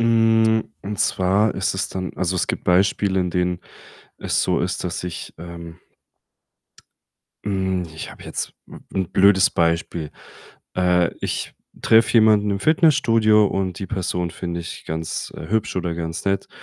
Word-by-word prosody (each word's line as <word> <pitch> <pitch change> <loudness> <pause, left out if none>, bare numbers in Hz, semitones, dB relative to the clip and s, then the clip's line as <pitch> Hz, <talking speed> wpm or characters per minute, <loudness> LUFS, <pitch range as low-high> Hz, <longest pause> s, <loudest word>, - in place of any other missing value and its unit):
Hm, 115 -1 +3
und 100 +1 -4
zwar 100 +2 +2
ist 95 - 0
es 95 - -2
dann 95 -1 -4
also, 90 0 -1
es - - 0
gibt - - -3
Beispiele, 95 +1 +2
in 90 -1 0
denen 90 0 -1 0.6
es - - 0
so - - +1
ist, - - -2
dass - - -3
ich, 90 - -6
ähm 85 0 -9 1.7
hm, 95 -2 -1
ich 80 - -7
habe - - -13
jetzt - - -4
'n - - -12
'n 95 -3 -2
blödes 95 0 +5
Beispiel. 85 -2 -1 0.6
Äh, 90 -1 +2
ich - - -3 0.3
treffe 110 0 +5
jemanden 110 -2 +5
im 100 - 0
Fitnessstudio 115 -9 +4
und 95 -2 -2
die 95 - -5
Person 90 -3 -2
finde 85 0 -5
ich 85 - -8
ganz, 80 0 -4
äh, 80 - -8
hübsch 110 -1 -1
oder 85 -2 -1
ganz 80 0 -4
nett. 100 0 -1
95 Hz, 155 wpm, -22 LUFS, 90-105 Hz, 1.7 s, blödes